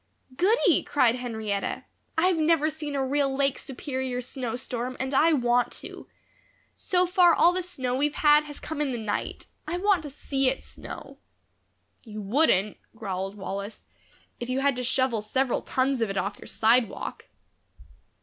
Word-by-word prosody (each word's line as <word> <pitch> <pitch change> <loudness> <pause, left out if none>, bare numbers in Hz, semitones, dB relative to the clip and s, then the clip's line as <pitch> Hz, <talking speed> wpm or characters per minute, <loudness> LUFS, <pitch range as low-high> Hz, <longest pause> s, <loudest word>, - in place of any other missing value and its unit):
"Goody!" 395 - +3
cried 250 -5 +3
Henrietta, 220 -5 -3 0.3
"I've 360 +1 +3
never 310 -1 +3
seen 300 -2 -5
a 270 -1 0
real 275 0 +1
Lake 275 -1 +1
Superior 260 -1 -4
snowstorm 250 0 -4
and 265 +1 -2
I 315 +5 +5
want 245 -3 +2
to. - - -10 0.7
So 365 -1 +1
far 355 -1 +5
all 345 +2 +5
the 370 - -1
snow 260 -9 -3
we've 290 +3 +1
had 300 0 +5
has 290 -1 -9
come 315 -1 -4
in 280 -3 0
the - - -2
night. 215 -2 -3 0.2
I 340 +3 -2
want 395 -1 +2
to 300 - -7
see 270 -1 0
it 270 - -4
snow." - - -10 0.8
"You 215 -2 -8
wouldn't," 210 - +2 0.2
growled 195 -2 -4
Wallace, 200 +1 -6 0.5
"if 240 - -5
you 260 +1 0
had 280 -1 +2
to 250 - -2
shovel 255 -2 +1
several 255 +4 0
tons 260 -1 0
of 225 - +1
it 195 - -3
off 200 +1 -2
your - - -11
sidewalk." 230 +1 +1
260 Hz, 160 wpm, -26 LUFS, 235-300 Hz, 0.8 s, I